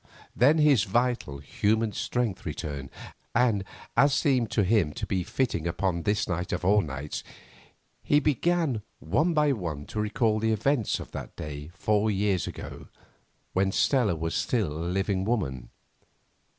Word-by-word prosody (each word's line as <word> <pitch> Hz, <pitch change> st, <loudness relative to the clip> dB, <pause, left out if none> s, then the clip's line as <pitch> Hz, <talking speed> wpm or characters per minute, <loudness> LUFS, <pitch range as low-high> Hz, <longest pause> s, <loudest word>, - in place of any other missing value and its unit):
Then 140 Hz, +7 st, +5 dB
his 145 Hz, -9 st, +4 dB
vital, 120 Hz, -, 0 dB
human 105 Hz, +10 st, 0 dB
strength 120 Hz, -3 st, -2 dB
returned, 70 Hz, -3 st, -5 dB, 0.5 s
and, 115 Hz, -5 st, +3 dB, 0.3 s
as 140 Hz, +3 st, +5 dB
seemed 130 Hz, -7 st, +2 dB
to 105 Hz, -, +2 dB
him 95 Hz, -6 st, +2 dB
to -, -, -4 dB
be 95 Hz, -, -1 dB
fitting 90 Hz, -4 st, -1 dB
upon 85 Hz, 0 st, -1 dB
this 105 Hz, +3 st, 0 dB
night 90 Hz, 0 st, -2 dB
of 90 Hz, 0 st, -2 dB
all 105 Hz, +2 st, +5 dB
nights, 75 Hz, -2 st, -5 dB, 0.8 s
he 145 Hz, -, +3 dB
began 150 Hz, -3 st, +1 dB, 0.2 s
one 155 Hz, -, +1 dB
by 150 Hz, -1 st, +4 dB
one 85 Hz, -, -3 dB
to 105 Hz, -, -3 dB
recall 110 Hz, 0 st, +1 dB
the 110 Hz, +1 st, +1 dB
events 115 Hz, +2 st, +1 dB
of -, -, -9 dB
that -, -, -7 dB
day 75 Hz, 0 st, -6 dB
four 105 Hz, +4 st, +1 dB
years 100 Hz, -2 st, +1 dB
ago, -, -, -8 dB, 0.7 s
when 95 Hz, +1 st, +2 dB
Stella 115 Hz, -5 st, +2 dB
was 80 Hz, +1 st, -3 dB
still 90 Hz, -2 st, 0 dB
a 80 Hz, -, -6 dB
living 95 Hz, +1 st, 0 dB
woman. 70 Hz, -, -2 dB
105 Hz, 150 wpm, -27 LUFS, 85-125 Hz, 0.8 s, Then